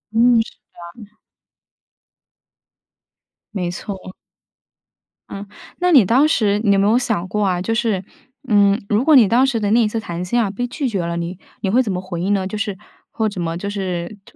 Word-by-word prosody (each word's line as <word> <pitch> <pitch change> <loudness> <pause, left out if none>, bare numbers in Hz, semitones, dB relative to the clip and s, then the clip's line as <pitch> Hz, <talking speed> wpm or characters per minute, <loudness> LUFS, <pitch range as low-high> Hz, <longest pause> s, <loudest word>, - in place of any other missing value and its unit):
嗯， 235 +1 +5
是 225 - -7 0.5
的。 210 +1 -23 2.4
没 180 -4 -2
错。 185 0 -7 1.2
嗯。 200 +1 -7 0.3
那 360 0 +2
你 265 - +7
当 255 +9 +4
时， 210 -9 +1
你 205 -3 +4
有 195 - +3
没 200 - +3
有 225 +3 +4
想 215 -8 -1
过 210 +2 -1
啊， 180 -2 0
就 225 +5 -1
是， 225 -5 0 0.4
嗯， 205 -2 +4
如 210 +3 +2
果 310 -1 +6
你 240 -6 +7
当 240 +5 +4
时 260 -4 0
的 205 -1 -1
那 235 +2 +4
一 220 - +2
次 225 +2 -3
谈 175 -4 -5
薪 235 +7 0
啊， 210 - 0
被 245 +5 -3
拒 275 +3 -3
绝 200 -5 -2
了， 170 0 -3
你 170 +1 -4 0.2
你 195 - -1
会 240 +6 +4
怎 225 -6 -2
么 180 -1 -3
回 180 -2 -6
应 195 +3 +1
呢？ 190 -2 0
就 215 - -5
是 205 -2 -3 0.3
或 220 -1 -1
怎 195 -3 -6
么 165 0 -3
就 200 +3 -4
是 190 -1 -4
特 - - -19
205 Hz, 215 characters per minute, -19 LUFS, 185-230 Hz, 2.4 s, 你